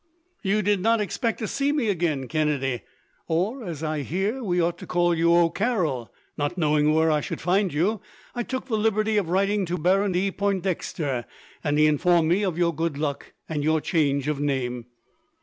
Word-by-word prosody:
"You 210 +2 +1
did 205 0 +2
not 225 +4 +2
expect 225 +3 -1
to 220 - -3
see 280 +7 0
me 290 -6 0
again, 165 -9 0
Kennedy; 140 -4 0 0.5
or, 195 +10 -1
as 165 -6 -6
I 155 -1 -1
hear 195 - -2
we 180 -4 0
ought 170 0 0
to - - -9
call 175 -1 +2
you, 170 0 +3
O'Carroll. 170 - +1 0.2
Not 145 +5 -2
knowing 150 -2 +3
where 160 0 +3
I 150 -1 +2
should - - -5
find 185 +2 +1
you, 190 +8 0 0.3
I 240 - -2
took 260 +3 -4
the 230 -5 -1
liberty 215 0 +1
of 190 -5 0
writing 200 +3 +1
to 175 +1 -2
Baron 190 +4 +2
de 190 +2 +1
Pointdexter, 185 -9 -2 0.4
and 145 -1 +1
he 155 - +5
informed 165 +2 +3
me 180 +4 +3
of 180 -5 -1
your 170 -1 +2
good 160 -1 -2
luck, 145 -1 -3
and 150 -2 -2
your 155 +1 +2
change 145 -4 0
of 150 -2 -1
name." 125 -4 -2
175 Hz, 190 wpm, -25 LUFS, 150-200 Hz, 0.5 s, he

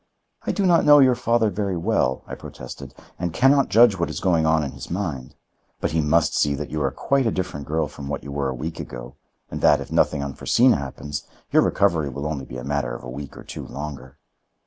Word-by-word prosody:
"I - - +2
do 200 - 0
not 175 -2 +4
know 145 0 +8
your 130 -3 +6
father 115 -3 +1
very 100 -1 -2
well," 85 -8 0
I - - -9
protested; 60 - -9 0.2
"and 90 -1 -2
can 135 +2 +5
not 140 -2 +3
judge 110 -4 +5
what 85 - 0
is - - -4
going 85 -4 +2
on 80 -1 +3
in 70 - -4
his - - -9
mind. 80 -9 -4 0.4
But - - -1
he 80 0 +1
must 80 +1 +2
see 70 -1 +2
that 75 +1 -6
you 75 0 -2
are 70 - +2
quite 135 - 0
a - - +1
different 75 -7 -4
girl 80 0 0
from 70 -1 -9
what 70 0 -4
you 70 - -7
were 70 -1 -1
a 65 - -3
week 80 +6 -5
ago, - - -8 0.4
and - - -5
that, - - +5
if - - -8
nothing 70 -2 +2
unforeseen 115 - +3
happens, 70 +1 -5 0.2
your - - +5
recovery 80 -4 +2
will 70 +3 -6
only 75 -3 -3
be 65 - -8
a 60 - -7
matter 70 -3 -2
of - - -9
a 60 - -7
week 70 +2 -8
or - - -10
two - - -8
longer." 70 -2 -8
75 Hz, 235 wpm, -23 LUFS, 70-100 Hz, 0.4 s, know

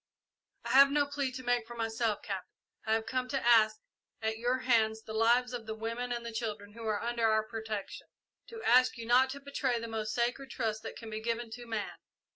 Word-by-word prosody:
"I - - -4
have 275 +1 +8
no 290 0 +2
plea 285 -2 -2
to 260 0 -6
make 245 -2 +1
for 240 - -8
myself, 225 -1 -1
Captain. 195 -3 -5 0.4
I 220 - +3
have 225 0 +1
come 255 -1 -1
to 270 -1 -2
ask 220 -2 +5 0.4
at 220 0 -2
your 245 +2 +1
hands 220 -3 +2
the 220 - -8
lives 240 +3 +3
of 230 -3 -5
the 220 - -3
women 230 +3 -4
and 235 -1 -3
children 210 -2 -4
who 230 0 -7
are 215 0 0
under 235 -1 +1
our 220 0 +3
protection 220 -2 -6 0.4
to 455 -1 -9
ask 255 +1 +5
you 230 - -6
not 250 +3 +5
to 280 +1 -5
betray 275 -3 -1
the 230 - -5
most 215 -1 -3
sacred 245 +3 -1
trust 220 -3 -2
that - - -7
can 225 -2 -9
be 215 0 -4
given 230 0 -2
to 240 +1 -8
man. 220 -3 -4
230 Hz, 220 wpm, -31 LUFS, 220-250 Hz, 0.4 s, have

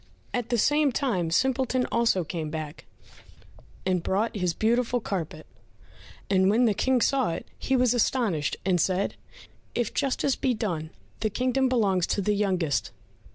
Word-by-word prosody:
At 245 -1 -2
the 240 - +1
same 290 +4 +3
time 220 - 0
Simpleton 260 +5 +1
also 230 -6 +2
came 160 -1 -4
back, 155 0 -6 1.0
and 185 -2 +1
brought 205 +7 -1
his 180 -4 -1
beautiful 240 +2 +1
carpet, 165 -7 -4 0.8
and 190 -1 +3
when 230 +4 +4
the 220 - +3
King 255 +4 +1
saw 265 -4 +2
it 165 - -6
he 265 - 0
was 250 -2 +3
astonished, 215 - 0
and 180 -3 +2
said, 190 +3 0 0.6
"If 240 - -1
justice 275 0 0
be 255 -2 0
done, 170 -8 -3 0.3
the 215 - 0
kingdom 255 +4 +1
belongs 200 -8 +2
to 205 - 0
the 210 - +2
youngest." 185 -7 0
215 Hz, 155 wpm, -26 LUFS, 180-250 Hz, 1.0 s, when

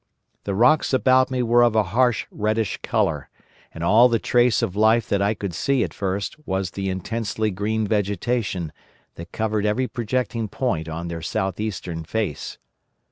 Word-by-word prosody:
The 100 - -2
rocks 125 +8 +3
about 130 0 +4
me 130 -1 -1
were 120 +1 +4
of 120 -2 +3
a 110 - +4
harsh 125 -1 +2
reddish 110 -1 -1
colour, - - -1 0.4
and 80 - -7
all 115 +8 +6
the 115 - +2
trace 120 0 +2
of 100 -5 -2
life 110 +1 +3
that 100 - +1
I 100 +2 +1
could 100 -4 -5
see 135 +7 +1
at - - -4
first 100 +4 -3
was 95 - -2
the 95 0 -3
intensely 110 +3 -2
green 105 +3 -1
vegetation 100 -3 -1 0.4
that 85 +1 -10
covered 110 -2 -1
every 105 +5 +1
projecting 115 -1 -2
point 90 -9 -2
on 85 +2 -5
their 85 -1 -5
south 95 +3 -2
eastern 90 -6 -4
face. 95 -3 -3
110 Hz, 170 wpm, -23 LUFS, 95-120 Hz, 0.4 s, all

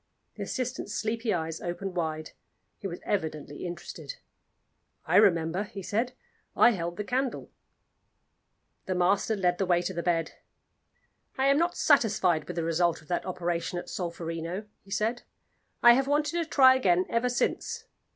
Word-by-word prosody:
The - - -10
assistant's 255 -4 -3
sleepy 230 +1 -1
eyes 160 -3 -2
opened 180 +2 -4
wide; 155 -2 -2 0.5
he 195 - -4
was 175 -2 -7
evidently 155 -4 -3
interested. 175 - -7 0.9
"I - - +3
remember," 175 -3 +4
he 200 -2 -7
said. 235 +7 -1 0.4
"I 240 - +7
held 175 -4 -3
the 210 - -2
candle." 255 +4 -2 1.4
The 185 - -1
master 195 +5 +2
led 180 -3 +1
the 195 - +1
way 175 -1 +3
to 190 - -3
the 170 - -2
bed. 165 -1 0 1.1
"I 265 - +2
am 275 +1 +4
not 345 +1 0
satisfied 195 - +3
with 180 - -5
the 170 - -1
result 165 0 +1
of - - -23
that 175 - -1
operation 175 -1 -2
at 175 - -6
Solferino," 170 +2 -4 0.2
he 195 - -20
said; 220 +4 -1 0.6
"I 240 - +10
have 270 +2 +1
wanted 295 +1 +1
to 340 -1 -1
try 265 -4 +6
again 185 -8 +3
ever 235 +2 +1
since. 460 - -1
190 Hz, 160 wpm, -28 LUFS, 170-240 Hz, 1.4 s, I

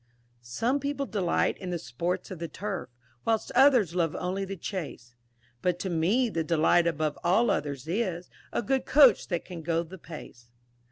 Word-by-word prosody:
"_ - - -38 0.4
Some 230 - -1
people 280 0 -2
delight 195 -8 0
in 185 - -5
the 175 - -1
sports 170 +9 -3
of 185 - -6
the 170 - -3
turf 195 -1 -5 0.3
Whilst 225 -1 0
others 250 - +5
love 170 -3 0
only 190 +2 -2
the 195 0 -6
chace, 155 - -6 0.5
But 180 -1 +1
to 185 +1 -3
me, 190 +10 +2
the 165 -7 -1
delight 165 +1 +3
above 155 -2 -1
all 200 +7 +3
others 140 -1 -3
is 180 -2 -2 0.2
A - - -1
good 265 0 0
Coach 270 -7 +6
that 175 -2 -2
can 175 -3 -7
go 165 +1 0
the 180 +3 -11
pace. 125 -8 -11
180 Hz, 180 wpm, -28 LUFS, 160-210 Hz, 0.5 s, Coach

